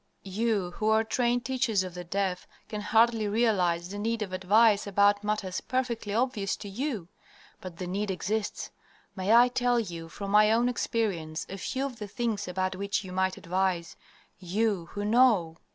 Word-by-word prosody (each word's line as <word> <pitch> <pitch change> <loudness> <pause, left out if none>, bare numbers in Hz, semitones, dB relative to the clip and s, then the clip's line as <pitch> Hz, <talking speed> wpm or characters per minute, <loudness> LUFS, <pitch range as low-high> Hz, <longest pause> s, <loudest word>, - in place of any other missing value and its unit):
"You 210 -4 0
who 215 - +1
are 220 0 +4
trained 240 +1 0
teachers 245 -6 +1
of 185 -1 -7
the 180 0 -6
deaf 185 0 -2 0.2
can 210 -1 -5
hardly 225 +1 +3
realize 185 -6 +1
the 205 +1 -6
need 225 +1 -1
of 190 -3 -7
advice 205 +3 +4
about 205 +1 +3
matters 210 -3 -2
perfectly 240 -5 -2
obvious 220 -3 0
to 205 - -9
YOU; 220 - -3 0.5
but 180 -3 -9
the 180 - -4
need 200 +3 -2
exists. 205 +3 -3 0.4
May 190 +1 -1
I 240 +2 +7
tell 245 -1 +1
you 170 -6 -5
from 200 +3 -6
my 210 +1 +6
own 235 +2 +3
experience 185 -10 -2
a 195 - -5
few 265 +8 -2
of 250 -4 -6
the 210 - -5
things 210 -1 -2
about 185 +1 -2
which 200 +2 -2
you 185 - -8
might 190 0 0
advise 180 -1 -1 0.4
you, 195 -1 -1
who 205 0 -3
know! 210 -8 +3
205 Hz, 175 wpm, -28 LUFS, 185-230 Hz, 0.5 s, I